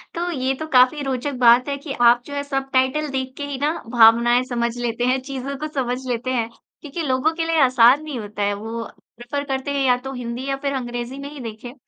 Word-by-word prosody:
तो 350 +1 -2
ये 265 -3 -1
तो 315 - -5
काफ़ी 255 +4 +5
रोचक 270 +1 -2
बात 245 +2 +6
है 280 - -1
कि 280 -1 -6
आप 240 0 +6
जो 285 - -9
हैं 285 0 -2
सबटाइटल 270 +1 0
देख 260 -1 -3
के 285 - -5
ही 280 -2 -5
ना 300 +2 +2 0.2
भावनाएँ 240 +1 +5
समझ 235 -1 -1
लेते 240 0 -2
हैं, 255 +1 +2
चीज़ों 275 0 -5
को - - -1
समझ 250 -2 -1
लेते 245 +1 -2
हैं 230 -3 -1 0.3
क्योंकि 305 +3 -6
लोगों 270 +4 +1
के 330 -1 -1
लिए 330 -1 +1
आसान 255 +2 +5
नहीं 295 -5 -5
होता 205 -1 -5
है। 205 0 +1
वो 225 +2 -5 0.4
प्रिफ़र 285 +4 -3
करते 270 +1 -2
हैं 280 -1 0
या 250 -1 +5
तो 270 - -4
हिंदी 245 +1 -5
या 275 - 0
फिर 280 -1 -1
अंग्रेज़ी 245 0 -4
में 280 +1 -6
ही 295 - -10
देखें। 240 +1 -8
260 Hz, 230 wpm, -21 LUFS, 240-280 Hz, 0.4 s, बात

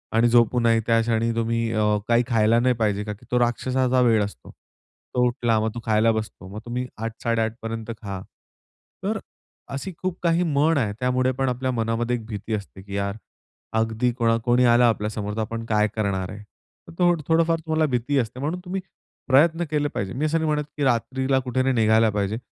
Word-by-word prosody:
आणि 115 +1 +5
झोपू 120 +1 +4
नाही 115 -1 +3
त्या 115 0 +4
क्षणी 115 0 +1
तुम्ही 115 0 0
अ, 110 - +1 0.3
काही 120 +1 +4
खायला 115 -1 +3
नाही 125 +1 +2
पाहिजे, 105 -2 +1
का 105 0 -4
की 105 - -17
तो 125 - +3
राक्षसाचा 125 +1 +1
वेळ 115 -4 +4
असतो. 100 - -8
तो 125 0 -5
उठला 120 -3 +1
मग 110 - 0
तो 120 - -3
खायला 110 +1 +3
बसतो. 110 -4 -5
मग 100 +3 -7
तुम्ही 125 +1 -3
8:00-8:30पर्यंत 115 0 -3
खा. 100 -2 -5 0.8
तर - - -1 0.5
अशी 140 +8 -4
खूप 185 -1 -2
काही 170 +1 +3
म्हण 155 0 +2
आहे 105 -6 0
त्यामुळे 125 0 +1
पण 135 -1 +1
आपल्या 130 +1 -1
मनामध्ये 115 +1 -1
भीती 110 +1 -5
असते, 100 -2 -5
की 100 0 -8
यार 100 +1 -2 0.6
अगदी 115 +2 +1
कोण 115 -1 +2
कोणी 125 +1 +4
आला 120 0 +5
आपल्या 105 -1 -1
समोर 105 -1 -4
तर 110 - -1
आपण 115 +1 -4
काय 105 -1 +2
करणार 95 -3 -1
आहे? 105 0 -9 0.5
तर 175 +1 +2
थोडंफार 165 0 +3
तुम्हाला 160 0 0
भीती 125 +4 0
असते 120 +1 -3
म्हणून 155 +6 -2
तुम्ही 190 +1 -3 0.5
प्रयत्न 160 +6 +4
केले 145 -1 +1
पाहिजे. 100 -7 -4
मी 145 +5 -1
असं 155 +2 +1
नाही 160 - -1
म्हणत, 150 -1 0
की 145 - -1
रात्रीला 130 +2 +1
कुठे 130 0 -1
नाही 130 -1 +1
निघायला 110 0 +4
पाहिजे. 105 +1 -1
115 Hz, 190 wpm, -24 LUFS, 110-130 Hz, 0.8 s, आणि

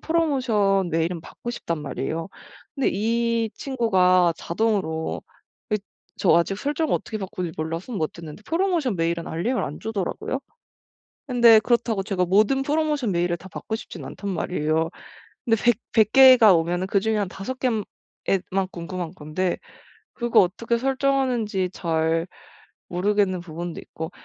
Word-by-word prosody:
프로모션 250 - +1
메일은 165 +1 -1
받고 240 - -8
싶단 170 -9 -4
말이에요. 155 +4 -4 0.5
근데 275 - +1
이 230 +2 0
친구가 185 -9 +3
자동으로 175 -5 -1 0.5
이 210 - +3 0.4
저 175 - +4
아직 170 +3 +2
설정을 295 +6 -1
어떻게 220 - -3
바꾸는지 185 -3 -4
몰라서 165 +8 -4
못 160 -8 -2
했는데 165 +3 -10
프로모션 330 - 0
메일은 170 0 -1
알림을 225 +11 -1
안 150 - -5
주더라구요. 220 - -3 0.9
근데 235 -3 +7
그렇다고 235 -2 +1
제가 190 -2 0
모든 215 +9 +3
프로모션 295 -5 0
메일을 175 -1 0
다 185 - -12
받고 220 - -4
싶진 175 -7 -8
않단 195 +9 -5
말이에요. 160 -2 0 0.6
근데 225 -2 +1
100- 240 -3 +4
100 220 -2 +4
개가 255 -6 +8
오면은 175 +2 0
그중에 210 +3 +1
한 200 -2 -1
5 200 +8 -6
개에 255 - +1 0.6
에만 190 0 0
궁금한 175 -1 -5
건데 155 +4 -2 0.5
그거 240 -2 +3
어떻게 225 +6 0
설정하는지 255 -7 0
잘 165 -1 0 0.6
모르겠는 195 +1 +1
부분도 170 0 -6
있고. 160 +1 -7
195 Hz, 320 characters per minute, -24 LUFS, 170-235 Hz, 0.9 s, 개가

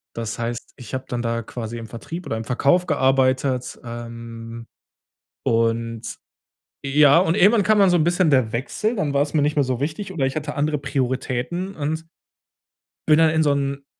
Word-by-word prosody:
das 115 -1 -4
heißt, 120 0 -4
ich 125 -3 -11
habe 130 0 -2
dann 120 -1 -2
da 115 0 -1
quasi 115 0 -6
im 115 - -7
Vertrieb 165 +10 -7
oder 110 - -3
im 110 - -5
Verkauf 140 +9 +2
gearbeitet. 130 -2 +1
Ähm, 115 -1 -8 0.8
und 115 0 0 0.8
ja, 145 +2 +5
und 170 -2 +2
irgendwann 205 +2 +5
kam 215 +1 +3
dann 195 -2 +6
so 175 - +4
'n 155 - +2
bisschen 175 0 +2
der 130 -6 +3
Wechsel, 210 - -1
dann 150 -8 -1
war's 145 +1 +1
mir 150 - +3
nicht 150 +1 +1
mehr 145 - +4
so 130 -2 -2
wichtig 185 +6 -3
oder 140 -6 0
ich 135 +2 -2
hatte 150 0 -4
andere 150 +1 0
Prioritäten 135 +7 -2
und 160 +2 -3 1.0
bin 155 - +7
dann 160 -1 +5
in 160 0 +2
so 150 - +3
'n 140 0 -2
135 Hz, 185 wpm, -22 LUFS, 120-160 Hz, 1.0 s, bin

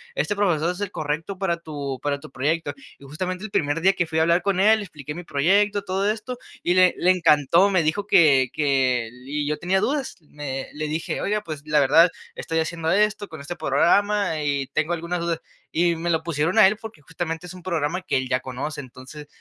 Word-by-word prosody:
este 205 -1 -1
profesor 175 -4 +1
es 180 - -8
el 205 -1 -2
correcto 155 +5 -3
para 175 -3 -1
tu 145 -5 -6
para 140 0 -2
tu 155 - -12
proyecto. 155 +5 -1 0.2
Y - - -18
justamente 180 +7 -5
el 215 - -6
primer 145 0 0
día 190 - +5
que 175 -3 -1
fui 160 0 -1
a - - +4
hablar 170 +2 +3
con 195 0 0
él, 220 +2 +5
le 205 - -5
expliqué 150 -4 -8
mi 175 - -8
proyecto, 200 +7 +2
todo 195 +1 0
esto, 225 +3 -4 0.3
y 175 - +2
le 185 -1 +5
le 180 - +4
encantó, 165 +1 +4
me 185 -4 +2
dijo 200 +7 -1
que 140 -9 +5
que 130 -5 +1
el 125 +3 -15
y 145 +1 -2
yo 150 +1 -1
tenía 190 +2 +1
dudas. 285 -1 -1
Me 145 -3 -6
le 155 0 -3
dije: 160 +2 -3
"Oiga, 210 +1 -1
pues 155 -5 -6
la 150 -1 +3
verdad, 165 +6 +6 0.3
estoy 160 0 -2
haciendo 160 0 -2
esto 210 +2 +1
con 160 -5 -10
este 175 +5 -7
programa 190 +4 +2
y 140 -2 -1
tengo 155 +5 -1
algunas 170 +1 -3
dudas", 170 -1 -2 0.3
y 170 0 +2
me 170 +1 -3
lo 160 -1 +1
pusieron 165 +3 -1
a 210 -3 +9
él 210 +2 0
porque 220 -8 -10
justamente 165 +2 -5
es 180 - -9
un 180 -1 -12
programa 170 0 -1
que 185 - -2
él 130 -1 -1
ya 130 0 +1
conoce. 130 +4 -5
Entonces, 130 +3 -10
165 Hz, 225 wpm, -23 LUFS, 145-185 Hz, 0.3 s, a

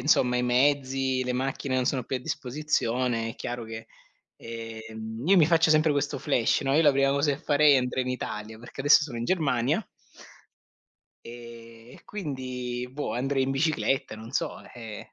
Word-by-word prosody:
insomma 125 -4 +3
i 125 - +1
mezzi, 130 0 +1
le 125 - -1
macchine 130 +1 -2
non 130 -1 +1
sono 130 -1 0
più 130 - -2
a - - -3
disposizione, 125 -4 -1
è - - -9
chiaro 120 -1 -5
che 110 0 -8 0.5
ehm, 110 -1 -7
io 195 - +6
mi 165 -4 +6
faccio 165 -1 +4
sempre 155 0 +4
questo 145 0 -1
flash, 125 -6 +1
no, 135 0 +1
io 160 - +5
la 150 - +6
prima 135 0 +3
cosa 140 +1 +2
che 140 - -4
farei 145 -1 +5
andrei 125 0 0
in 125 - -2
Italia, 110 -3 -5
perché 120 +3 -10
adesso 145 +3 +6
sono 140 -6 -5
in 115 - -3
Germania 145 - +1 1.4
e 115 0 -12
e - - -15
quindi 130 -8 -5
boh, 135 -5 -4
andrei 135 +2 0
in 135 - -2
bicicletta, 135 -5 0
non 110 +3 -10
so, - - -2 0.2
eh 115 -3 -9
130 Hz, 180 wpm, -27 LUFS, 120-145 Hz, 1.4 s, io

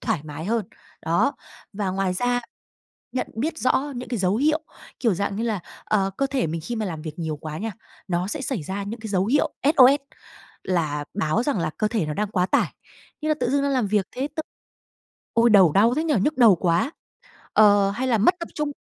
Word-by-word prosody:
thoải 160 - -1
mái 150 +1 -7
hơn. 220 +1 0 0.4
Đó! 170 - +2 0.4
Và 200 -2 -2
ngoài 190 0 0
ra, 245 +4 +1 0.7
nhận 255 - -1
biết 310 +8 -2
rõ 280 +3 +1
những 245 0 -6
cái 240 - -2
dấu 190 +1 +1
hiệu 305 +5 +2 0.4
kiểu 225 -7 +2
dạng 200 +2 -2
như 220 - -2
là, 220 -5 -1 0.2
ờ, 195 -2 +1
cơ 275 - +1
thể 270 -6 -1
mình 165 +1 -3
khi 240 - -4
mà 220 -1 -2
làm 160 -4 -5
việc 155 +1 -7
nhiều 160 -2 -3
quá 155 +1 -6
nha, 225 +4 -3 0.4
nó 175 0 0
sẽ 290 - -3
xảy 260 - -3
ra 190 +6 -4
những 215 +4 -6
cái 220 - -6
dấu 190 -2 +1
hiệu 280 +6 +2
SOS, 280 -1 +6 0.6
là 155 -5 -1
báo 190 +2 +1
rằng 265 -5 0
là 165 - -1
cơ 215 - +1
thể 215 -7 -1
nó 150 - -3
đang 210 +5 -1
quá 180 -3 +1
tải. - - +1 0.5
Như 310 - -2
là 310 - +3
tự 245 -1 +1
dưng 280 +1 +2
đang 280 - +1
làm 255 -5 +1
việc 205 -1 +1
thế 270 +3 -3
t 315 - -2 0.9
ôi, 230 +1 +4
đầu 190 -7 +6
đau 225 +7 +4
thế 310 +4 0
nhỉ, 315 -3 +1
nhức 300 +7 0
đầu 225 -7 +7
quá! 170 - +1 0.6
Ờ, 205 -2 +5
hay 245 +6 -2
là 240 -3 +3
mất 225 - +4
tập 335 - -5
trung, 300 -1 -1
215 Hz, 225 wpm, -24 LUFS, 185-255 Hz, 0.9 s, đầu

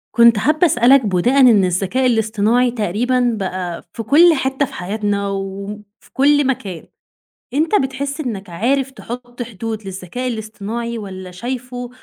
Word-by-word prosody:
كنت 235 -1 +6
حابّة 305 - +3
اسألك 250 -2 +4
بُناءً 205 +8 +2
إن 230 -7 +6
الذكاء 195 +8 0
الاصطناعي 225 +1 +2
تقريبًا 245 +3 0
بقى 185 -2 -4
في 225 - -5
كل 325 +9 +6
حتّة 265 +1 0
في - - -13
حياتنا 200 +1 -2
وم 195 +1 -5 0.2
في - - -23
كل 290 +1 +3
مكان، 195 -10 -3 0.7
أنت 315 +8 +1
بتحس 275 +2 -3
إنك 205 -8 -5
عارف 260 +9 0
تحط 245 -1 -8
حدود 220 -1 -6
للذكاء 195 +6 -5
الاصطناعي، 225 +1 -4
والّا 190 -3 -8
شايفُه 245 +5 -5
235 Hz, 140 wpm, -18 LUFS, 200-255 Hz, 0.7 s, كنت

